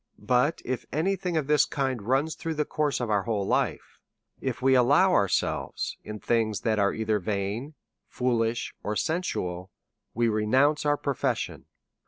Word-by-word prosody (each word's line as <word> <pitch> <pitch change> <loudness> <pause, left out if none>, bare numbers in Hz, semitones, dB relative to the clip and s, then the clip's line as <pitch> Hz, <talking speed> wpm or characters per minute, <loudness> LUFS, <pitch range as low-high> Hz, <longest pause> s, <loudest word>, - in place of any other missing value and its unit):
But 125 +5 +1
if 130 0 -2
any 185 +6 +1
thing 180 -3 -2
of 155 - 0
this 150 0 +4
kind 130 -4 -2
runs 135 +8 +1
through 165 -1 -4
the 150 0 0
course 150 -2 -1
of 120 -3 -2
our 105 -1 +3
whole 105 -1 -1
life, - - -1 0.4
if 130 -3 -3
we 130 +1 +3
give 125 -1 +4
ourselves 145 - +2
to 105 0 -6
things 110 -1 0
that 110 -2 +1
are 100 0 +3
either 110 -1 0
vain, 105 - -3 0.3
foolish, 120 -2 -1
or 105 - -3
sensual, 95 - -2 0.5
we 120 +1 +2
re 105 -1 0
nounce 145 +6 +3
our 145 0 +3
profession. 140 -3 -2
125 Hz, 165 wpm, -27 LUFS, 105-145 Hz, 0.5 s, this